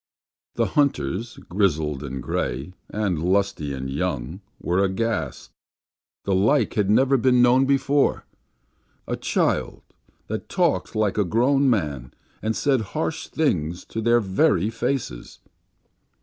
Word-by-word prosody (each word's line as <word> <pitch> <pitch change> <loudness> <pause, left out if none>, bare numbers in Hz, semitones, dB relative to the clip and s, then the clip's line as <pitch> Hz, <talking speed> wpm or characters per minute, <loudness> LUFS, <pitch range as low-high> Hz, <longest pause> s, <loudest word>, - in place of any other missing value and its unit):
The - - +2
hunters, 115 - 0
grizzled 80 -7 0
and 65 -3 -5
gray, 70 +9 -3 0.2
and 100 -7 -1
lusty 90 -5 0
and 65 -1 -4
young, 75 +2 -3 0.2
were 90 +3 +1
aghast. 95 - -2 0.7
The 100 - +1
like 105 +10 +2
had 105 -2 +1
never 135 +5 +4
been 125 0 +4
known 130 +2 +4
before. 140 +1 +2 0.8
A - - -1
child, - - -1 0.4
that - - -5
talked - - 0
like 105 -1 +1
a - - +4
grown 130 +8 +2
man, 75 - -2 0.3
and 110 +1 -1
said 135 -4 +2 0.2
harsh 160 0 -2
things 90 - -1
to 110 - -2
their 120 +1 +4
very 95 0 +2
faces! 115 - -3
100 Hz, 125 wpm, -23 LUFS, 80-120 Hz, 0.8 s, never